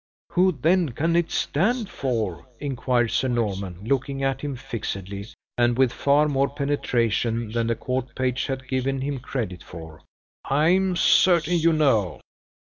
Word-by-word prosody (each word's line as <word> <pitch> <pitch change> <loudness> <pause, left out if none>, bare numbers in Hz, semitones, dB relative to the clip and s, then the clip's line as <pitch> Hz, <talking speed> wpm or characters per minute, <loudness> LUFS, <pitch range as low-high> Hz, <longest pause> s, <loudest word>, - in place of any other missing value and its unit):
"Who 185 +1 +3
then 160 +1 +1
can 165 +6 0
it 170 -1 +2
stand 215 - 0
for?" 115 - -3
inquired 125 -4 0
Sir 130 - +1
Norman, 100 -6 -2
looking 135 +3 -1
at 135 -1 0
him 145 -2 -3
fixedly, 100 -6 -5 0.3
and 120 0 +3
with 130 -2 +3
far 145 +2 +3
more 140 -1 +1
penetration 120 -5 0
than 115 0 0
the 115 - +1
court 130 +2 -3
page 130 0 -1
had 130 -1 -4
given 130 +1 -1
him 140 0 -2
credit 115 -8 -4
for. 80 -2 -11 0.4
"I 150 +4 +2
am 190 0 +2
certain 175 -1 +4
you 165 +1 +4
know." 130 - +2
130 Hz, 150 wpm, -24 LUFS, 115-145 Hz, 0.4 s, certain